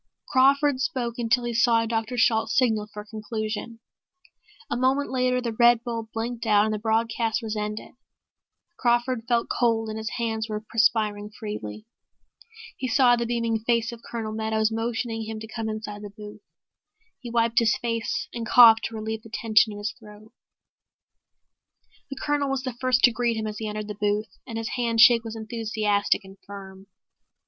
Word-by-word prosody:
Crawford 275 0 +3
spoke 245 -6 -2
until 240 +1 +1
he 240 0 -3
saw 230 0 +3
Dr. 225 +1 -2
Shalt 225 -1 +3
signal 220 -5 +1
for 210 0 -8
a - - -14
conclusion. 215 +1 -5 0.9
A - - -2
moment 265 +3 +1
later 255 -1 +1
the 235 -2 -3
red 235 0 +4
bulb 230 -2 -4
blinked 230 +1 -4
out 210 0 +5
and 215 - -1
the 215 - -3
broadcast 225 +1 0
was 220 -1 -3
ended. 210 0 -4 0.9
Crawford 240 0 +1
felt 235 -1 +1
cold 225 -2 +1
and 215 0 -4
his 220 0 -4
hands 225 -1 -2
were 210 0 -2
perspiring 215 -2 +1
freely. 210 - -7 0.9
He 260 - -4
saw 245 0 +5
the 235 -1 -2
beaming 230 -1 0
face 230 +1 0
of 235 -1 -10
Colonel 225 -2 -5
Meadows 220 0 0
motioning 225 0 -2
him 220 0 -5
to 220 - -7
come 220 0 -4
inside 210 -1 -6
the 205 - -7
booth. 210 0 -11 0.8
He 245 - -8
wiped 230 0 +2
his 230 +3 +2
face, 230 -1 -2
and 235 - -4
coughed 225 -1 +7
to 230 - -5
relieve 220 0 -4
the 225 - -14
tension 220 0 +3
in 205 - -8
his 205 +1 -3
throat. 215 0 -15 1.8
The 275 - -5
Colonel 290 -1 0
was 270 -1 -2
the 255 -2 -4
first 255 +1 +1
to 245 - +7
greet 235 -1 0
him 220 - -3
as 215 -1 -5
he 220 - -4
entered 210 0 -4
the 210 - -4
booth, 210 +1 -1 0.2
and 230 -2 -5
his 225 -1 -3
handshake 235 -1 +5
was 225 -1 -7
enthusiastic 215 -2 0
and 195 0 -14
firm. 195 -1 -10
Dr. - - -49
225 Hz, 180 wpm, -25 LUFS, 215-240 Hz, 1.8 s, coughed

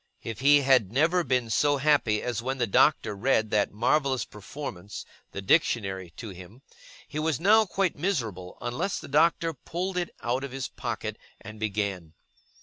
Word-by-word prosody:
If 115 - -6
he 145 +1 +6
had 130 -7 +3
never 165 +8 +2
been 125 -5 0
so 145 +4 +3
happy 135 -7 +2
as 120 -3 -2
when 130 +3 -3
the 120 - +1
Doctor 105 0 +3
read 110 0 +1
that 105 -1 +2
marvellous 130 +2 +1
performance, 105 -3 -8 0.3
the 100 - -6
Dictionary, 95 - +1
to 115 - -7
him; 95 +7 -12 0.4
he 150 0 -5
was 155 -3 0
now 215 +4 +5
quite 190 -1 0
miserable 115 - -3
unless 125 +11 -2
the - - -10
Doctor 165 +3 +2
pulled 180 +6 -4
it 175 -1 -1
out 125 +3 -1
of 140 - -5
his 135 -1 -3
pocket, - - -5 0.2
and 110 0 -11
began. 100 -6 -3
125 Hz, 165 wpm, -27 LUFS, 105-150 Hz, 0.4 s, he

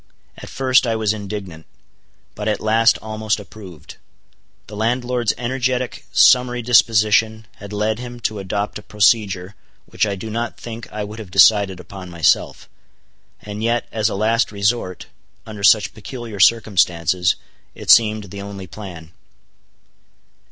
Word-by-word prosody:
At - - -11
first 130 -1 +2
I 115 - 0
was 110 -1 0
indignant; 100 -6 -7 0.7
but 105 0 -5
at 105 -2 0
last 115 +2 +3
almost 110 0 -2
approved. 95 -7 -12 0.7
The 105 - -11
landlord's 120 +1 0
energetic, 125 +1 -2
summary 125 -1 +4
disposition 110 -1 +3
had 100 0 -11
led 105 +2 -1
him 120 -1 -8
to 110 -2 -2
adopt 100 +2 -3
a - - -12
procedure 100 -3 +1 0.3
which - - -1
I 100 - -2
do 110 +3 -7
not 115 +1 -3
think 115 -1 -9
I 105 0 -4
would 105 +2 -8
have 105 -4 -9
decided 95 0 +4
upon 90 0 -10
myself; 85 -2 0 0.8
and 105 0 -7
yet 115 +1 0
as 110 -1 0
a - - -4
last 110 +3 +1
resort, 100 -2 -1 0.4
under 105 -2 -9
such 105 -1 +4
peculiar 115 -1 -8
circumstances, 90 -5 +2 0.4
it - - +1
seemed 110 -4 +4
the 100 - -7
only 100 -1 -8
plan. 90 -4 -10
105 Hz, 140 wpm, -20 LUFS, 100-115 Hz, 0.8 s, summary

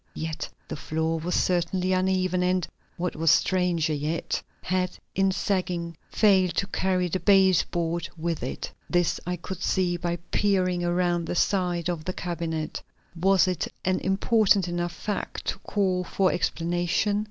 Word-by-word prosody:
Yet 160 -1 -4 0.2
the - - -4
floor 160 +2 -1
was 175 +3 -2
certainly 180 +1 +1
uneven, 185 -1 +1
and, 180 -1 +1 0.3
what 180 0 -2
was 165 +1 +2
stranger 175 -3 +2
yet, 150 +3 -2 0.2
had, 185 0 -1 0.2
in 195 0 +2
sagging, 180 -3 -1
failed 190 -5 +3
to - - +1
carry 185 -2 0
the 185 +2 -1
base 190 -3 +5
board 170 0 -2
with 165 0 -2
it. 125 - -4 0.2
This 175 -1 +1
I 180 - 0
could 180 +1 -7
see 180 -2 +1
by 175 0 -1 0.2
peering 185 -3 +2
around 175 -1 +1
the - - -2
side 175 -3 +1
of 170 -3 -2
the 185 - -2
cabinet. 165 -3 -3 0.3
Was 190 +2 +4
it 180 -3 -1 0.2
an 185 0 +2
important 195 0 +3
enough 175 0 -2
fact 205 +4 -4
to - - -2
call 185 -3 0
for 185 +1 +1
explanation? 175 +4 0
180 Hz, 155 wpm, -26 LUFS, 170-185 Hz, 0.3 s, base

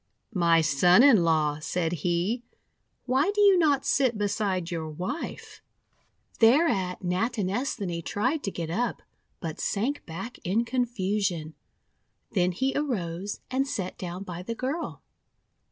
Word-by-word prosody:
'My 170 -3 +4
Son 160 - +5
in 240 -11 +6
law," 155 -2 +2
said 165 +1 -1
he, 175 - 0 0.6
;'why 265 +7 +2
do - - 0
you 400 -2 +7
not 290 -6 +3
sit 255 -5 +2
beside 200 -4 -1
your 160 -2 -3
wife?' 185 - -6 0.8
Thereat 225 - +3
Natinesthani 200 -1 -1
tried 255 - -1
to - - 0
get 165 -4 -5
up, 235 +7 -1 0.4
but 160 -3 -5
sank 250 +8 -1
back 190 +9 -7
in 215 +6 +1
confusion. 200 -9 -1 0.8
Then 180 -3 +2
he 265 +10 -1
arose 200 - -2
and 270 +2 +1
sat 190 -9 -3
down 180 +1 -5
by 175 -2 -6
the 230 +5 -5
girl. 270 +8 -4
195 Hz, 130 wpm, -27 LUFS, 175-250 Hz, 0.8 s, you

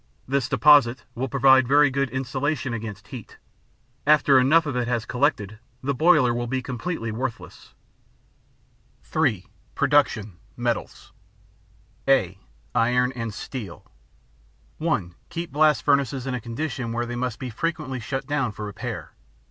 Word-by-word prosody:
This 135 -1 0
deposit 135 -1 +5
will 130 +2 -3
provide 130 -1 +5
very 145 +1 +5
good 140 0 0
insulation 130 +1 -2
against 110 -3 -7
heat; 125 -6 -10 0.7
after 145 -3 +6
enough 155 +6 +4
of 145 -4 -3
it 125 -1 -1
has 120 -3 -1
collected, 110 -6 -1 0.2
the 140 +2 0
boiler 150 -4 +4
will 120 0 -2
be 130 +2 -1
completely 125 -1 -4
worthless. 120 +2 -6 1.3
(3) 125 - 0 0.3
Production. 135 -9 +2 0.2
Metals 120 -2 -3 1.0
(a) 95 -9 +2 0.3
Iron 125 +2 +2
and 115 -3 -5
Steel 105 -4 -8 0.9
(1) 150 - -1 0.2
Keep 170 -2 -5
blast 150 +1 +3
furnaces 140 -3 +1
in 135 - -2
a 125 - -3
condition 120 0 -4
where 120 +1 -1
they 120 0 -5
must 120 -2 -2
be 130 -2 -6
frequently 135 -1 -3
shut 135 +3 -4
down 135 -4 -1
for 105 +1 -7
repair. 105 - -6
130 Hz, 135 wpm, -24 LUFS, 115-140 Hz, 1.3 s, after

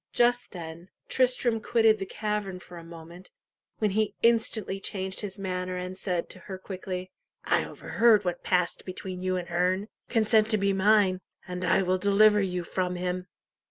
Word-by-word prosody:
Just 245 0 +2
then, 170 0 -9 0.2
Tristram 245 -3 +2
quitted 225 -2 +3
the 195 - -4
cavern 210 -3 -3
for 180 - -13
a 170 - -9
moment, 170 +2 -12 0.5
when 215 -2 +1
he 215 +1 0
instantly 225 -4 +2
changed 190 -1 -4
his 205 -2 -5
manner, 185 -1 -3
and 180 +1 -5
'said 180 -3 -2
to - - -8
her 190 -2 -7
quickly, 185 -1 -6 0.3
"I - - +2
overheard 225 -3 +3
what 175 -1 -2
passed 180 -1 0
between 185 0 -6
you 185 0 0
and 175 -1 -5
Herne. 185 +4 0 0.2
Consent 220 -1 +3
to 215 - +3
be 200 -1 +1
mine, 195 -1 +4 0.3
and 180 0 -5
I 180 +1 +3
will 185 0 +1
deliver 205 +2 +5
you 180 -2 -1
from 180 +1 -2
him." 180 0 -3
190 Hz, 170 wpm, -28 LUFS, 180-215 Hz, 0.5 s, deliver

